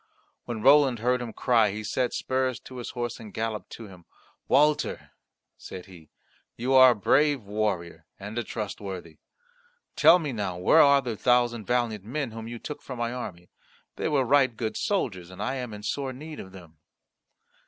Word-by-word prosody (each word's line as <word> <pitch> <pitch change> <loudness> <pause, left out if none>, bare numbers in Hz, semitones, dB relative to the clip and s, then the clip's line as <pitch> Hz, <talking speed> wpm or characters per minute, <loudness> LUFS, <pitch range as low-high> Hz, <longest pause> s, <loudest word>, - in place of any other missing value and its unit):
When 110 -3 -5
Roland 140 -3 +6
heard 125 +2 0
him 120 -2 -5
cry 115 -2 +2
he 105 +2 -5
set 125 +3 -1
spurs 130 -1 -1
to 130 0 -11
his 120 - -6
horse 120 -1 -4
and 110 -2 -10
galloped 110 0 -4
to 115 - -9
him. 90 -3 -15 0.4
"Walter," 150 +1 +2 0.5
said 90 -1 -9
he, 85 -5 -15 0.5
"you 125 +3 -1
are 130 -1 +9
a 120 - +3
brave 140 +5 +2
warrior 100 -6 -3
and 105 +2 -7
a - - -2
trustworthy. 95 -7 -6 0.8
Tell 160 +4 +7
me 150 -6 -4
now 100 -5 -3
where 90 - +5
are 140 -1 +5
the 120 -3 -3
thousand 120 -1 +1
valiant 120 -5 0
men 130 +3 -3
whom 115 0 -7
you 120 0 -6
took 150 +5 -7
from 130 - -8
my 120 0 -2
army. 90 -8 -7 0.4
They - - -2
were 140 -4 +2
right 130 -3 +3
good 110 -3 -3
soldiers, 95 - -2
and 95 - -12
I 105 +6 -2
am 125 -3 -5
in 105 0 -9
sore 135 +4 -3
need 150 +4 -9
of 95 - -9
them." 85 -5 -14
115 Hz, 185 wpm, -26 LUFS, 105-130 Hz, 0.8 s, are